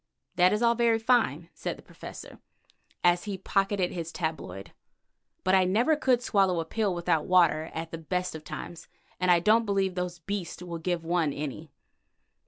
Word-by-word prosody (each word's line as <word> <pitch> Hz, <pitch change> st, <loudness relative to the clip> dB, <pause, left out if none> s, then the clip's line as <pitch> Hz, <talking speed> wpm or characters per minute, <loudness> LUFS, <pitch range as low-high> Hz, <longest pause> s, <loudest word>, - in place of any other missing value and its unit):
"That 180 Hz, +1 st, +5 dB
is 210 Hz, +3 st, 0 dB
all 235 Hz, 0 st, +5 dB
very 235 Hz, -1 st, +3 dB
fine," 220 Hz, -, +1 dB
said -, -, -4 dB
the -, -, -15 dB
Professor -, -, -11 dB, 0.6 s
as 175 Hz, +2 st, +3 dB
he 200 Hz, -2 st, -4 dB
pocketed 195 Hz, -1 st, 0 dB
his 165 Hz, -2 st, -5 dB
tabloid, 160 Hz, -, -5 dB, 0.7 s
"but 185 Hz, -, +2 dB
I 190 Hz, -1 st, +6 dB
never 225 Hz, +12 st, +3 dB
could 255 Hz, -4 st, +2 dB
swallow 195 Hz, -6 st, +2 dB
a 165 Hz, -, -2 dB
pill 210 Hz, -2 st, -1 dB
without 165 Hz, -3 st, 0 dB
water 170 Hz, -3 st, +3 dB
at 165 Hz, 0 st, -5 dB
the 165 Hz, -, -5 dB
best 180 Hz, +3 st, -2 dB
of 160 Hz, -1 st, -8 dB
times, 170 Hz, +1 st, -8 dB, 0.3 s
and 180 Hz, 0 st, +1 dB
I 175 Hz, -1 st, +6 dB
don't 215 Hz, +6 st, +4 dB
believe 195 Hz, -3 st, 0 dB
those 180 Hz, -1 st, -3 dB
beasts 180 Hz, 0 st, -5 dB
will 170 Hz, -2 st, -6 dB
give 170 Hz, 0 st, -2 dB
one 165 Hz, -3 st, +1 dB
any. 150 Hz, +2 st, -6 dB
180 Hz, 180 wpm, -28 LUFS, 165-205 Hz, 0.7 s, I